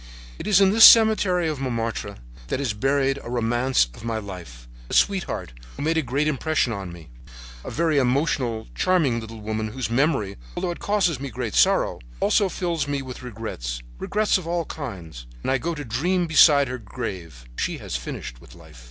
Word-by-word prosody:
"It - - -6
is 200 -3 +5
in 195 -1 +5
this 225 +2 +5
cemetery 210 -6 +7
of 155 -3 -3
Montmartre 115 -5 -3 0.3
that - - -2
is 135 -6 -1
buried 135 +4 +1
a - - -8
romance 120 - +1
of 105 - -13
my 115 -1 -2
life, 90 - -9 0.2
a - - -2
sweetheart 190 - 0 0.2
who - - -4
made 160 +2 +1
a 160 - +2
great 140 +3 -1
impression 155 -3 0
on 95 -4 -6
me, 85 -3 -12 0.5
a - - -6
very 160 -2 +1
emotional, 125 -4 0
charming 160 -11 +1
little 110 0 -9
woman 110 +1 -3
whose 115 +1 -4
memory, 125 -6 +1 0.2
although 175 - -1
it 170 - -7
causes 190 -8 +1
me 140 0 -5
great 120 -3 -4
sorrow, - - +3 0.2
also 200 -2 +2
fills 170 -5 -2
me 140 -1 -2
with 130 -1 -8
regrets—regrets 100 - -3
of 170 - -9
all 170 -1 -1
kinds. 85 - -8 0.2
And - - 0
I 135 - +2
go 170 +3 -3
to 145 -1 -6
dream 175 +11 0
beside 150 -3 +6
her 130 0 -5
grave. 90 - -7
She - - -2
has - - -6
finished - - -6
with - - -15
life. - - -15
130 Hz, 185 wpm, -24 LUFS, 110-160 Hz, 0.5 s, cemetery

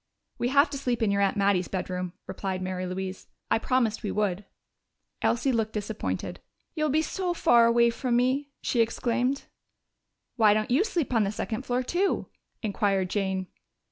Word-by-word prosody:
"We 240 - +1
have 280 +4 +5
to 280 - -4
sleep 245 -4 -1
in 205 - +2
your 200 0 +1
aunt 200 +1 +2
Mattie's 195 -3 +2
bedroom," 180 -1 -3
replied 190 -2 -3
Mary 185 0 -3
Louise. 190 +1 -5 0.2
"I - - +4
promised 230 -2 +1
we 210 - -3
would." 205 -2 -1 0.8
Elsie 250 +3 +2
looked 225 -2 0
disappointed. 210 0 -3 0.3
"You'll 305 -2 0
be 310 +3 +2
so 355 +2 -2
far 235 -7 +5
away 235 0 +4
from 240 +1 -1
me!" 260 +4 +1
she 240 - 0
exclaimed. 245 +4 0 0.9
"Why 215 -3 +6
don't 215 +2 -1
you 280 +10 +4
sleep 340 - -1
on 225 -2 +4
the 200 - 0
second 220 +3 -4
floor 250 +1 +1
too?" 365 +9 0 0.4
inquired 200 -3 0
Jane. 190 -2 -1
225 Hz, 170 wpm, -27 LUFS, 195-255 Hz, 0.9 s, Why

